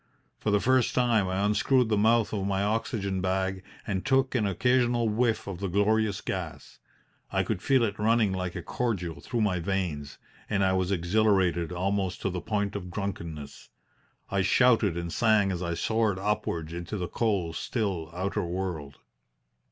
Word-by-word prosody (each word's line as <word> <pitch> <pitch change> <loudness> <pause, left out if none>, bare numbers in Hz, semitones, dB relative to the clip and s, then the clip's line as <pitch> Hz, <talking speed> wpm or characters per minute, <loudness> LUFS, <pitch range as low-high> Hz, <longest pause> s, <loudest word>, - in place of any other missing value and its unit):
For - - -1
the 105 0 +3
first 130 +1 +2
time 120 -6 +3
I 95 +2 0
unscrewed 120 +3 +2
the 110 - +3
mouth 110 +2 +3
of 100 -2 -1
my 100 0 0
oxygen 100 -3 -1
bag 95 0 -1 0.2
and 95 -2 -2
took 135 0 +2
an 110 -5 +1
occasional 120 +3 +2
whiff 110 0 +1
of 95 -3 -6
the 100 - -2
glorious 105 +1 +1
gas. - - -6 0.5
I - - +1
could 90 - -3
feel 130 +2 +3
it 105 -2 -2
running 110 -1 +3
like 90 -1 -3
a - - -5
cordial 95 -9 -2
through 120 -2 -2
my 95 -4 +1
veins, 85 -6 -3 0.3
and 100 -2 +2
I 95 - +2
was 95 0 0
exhilarated 90 -2 +2
almost 95 +1 -1
to 95 - 0
the 90 -1 -4
point 100 +1 -2
of 90 -3 -5
drunkenness. 85 -6 -6 0.6
I 100 0 +2
shouted 105 -2 +3
and 85 -1 -4
sang 110 -4 +3
as 90 -1 -3
I 85 -1 -2
soared 110 0 +1
upwards 90 -5 -2
into 85 +5 -5
the 90 -2 -3
cold, 100 -8 -1
still 95 -9 -2
outer 95 +3 -2
world. 85 -6 -4
100 Hz, 170 wpm, -28 LUFS, 90-110 Hz, 0.6 s, the